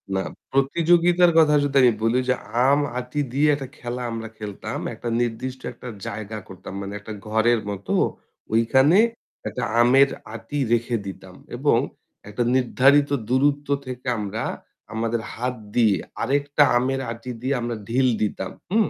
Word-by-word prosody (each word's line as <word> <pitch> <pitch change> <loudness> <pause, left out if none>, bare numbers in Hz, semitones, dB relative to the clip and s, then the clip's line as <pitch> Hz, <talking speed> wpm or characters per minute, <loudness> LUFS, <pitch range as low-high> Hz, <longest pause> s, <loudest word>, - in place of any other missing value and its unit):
না, 95 - +1 0.3
প্রতিযোগিতার 170 +5 +4
কথা 155 -2 +6
যদি 140 -1 -2
আমি 125 - +7
বলি 115 +2 +2
যে - - +5 0.3
আম-আটি 140 -2 0
দিয়ে 145 +3 +3
একটা 135 -2 -6
খেলা 120 +1 -5
আমরা 115 -1 -5
খেলতাম, 105 -2 -5 0.2
একটা 120 - -5
নির্দিষ্ট 125 +2 -3
একটা - - -11 0.2
জায়গা 110 +1 -5
করতাম। 95 0 -10
মানে 100 0 -6
একটা 105 +1 -8
ঘরের 110 +2 +3
মতো 100 -1 -4 0.6
ঐখানে 130 +9 +4 0.5
একটা 125 - -4 0.2
আমের 135 +3 +6 0.2
আঁটি 145 +5 -5
রেখে 120 +1 +1
দিতাম। 95 - -9 0.2
এবং - - +3 0.5
একটা 105 +4 -1
নির্ধারিত 135 +3 +4 0.2
দূরত্ব 145 +3 +2 0.2
থেকে 130 0 -7
আমরা 105 +1 -3 0.5
আমাদের 115 +1 -1
হাত 125 +2 -3 0.2
দিয়ে 110 -5 +4 0.3
আরেকটা 145 +1 +2
আমের 135 +2 0
আঁটি 115 +2 -7
দিয়ে 130 +2 0
আমরা 120 0 -2
ঢিল 130 +3 +3
দিতাম, 95 -3 -2 0.2
হুম? 215 0 +3
125 Hz, 145 wpm, -23 LUFS, 115-140 Hz, 0.6 s, আমি